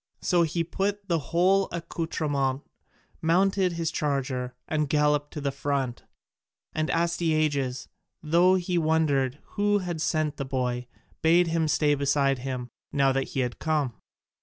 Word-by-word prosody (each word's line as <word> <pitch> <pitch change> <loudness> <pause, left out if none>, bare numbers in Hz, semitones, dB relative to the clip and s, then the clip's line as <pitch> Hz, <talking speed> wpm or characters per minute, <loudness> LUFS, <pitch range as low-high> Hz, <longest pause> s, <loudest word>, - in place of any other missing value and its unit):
So 175 -2 +3
he 165 +1 +1
put 195 +4 -1
on - - -29
the 170 -2 +2
whole 185 +3 +3
accoutrement, 150 -5 -2 0.6
mounted 185 +2 +2
his 165 -1 -2
charger, 135 -4 -2
and 150 -2 0
galloped 150 0 +2
to 150 - -5
the 140 -1 -1
front. 135 -3 -2 0.7
And 155 0 -1
Astyages, 155 -6 0 0.4
though 170 +4 +4
he 180 -1 0
wondered 150 -5 +1 0.2
who 205 0 +4
had 175 -5 -3
sent 155 -1 0
the 140 - -2
boy, 125 -2 -2 0.3
bade 170 +2 +4
him 165 -1 +1
stay 150 -1 +3
beside 140 -1 +1
him, 125 -1 -4 0.2
now 135 -1 +3
that 135 0 0
he - - +3
had 125 -2 -3
come. 150 -6 0
155 Hz, 145 wpm, -27 LUFS, 135-170 Hz, 0.7 s, though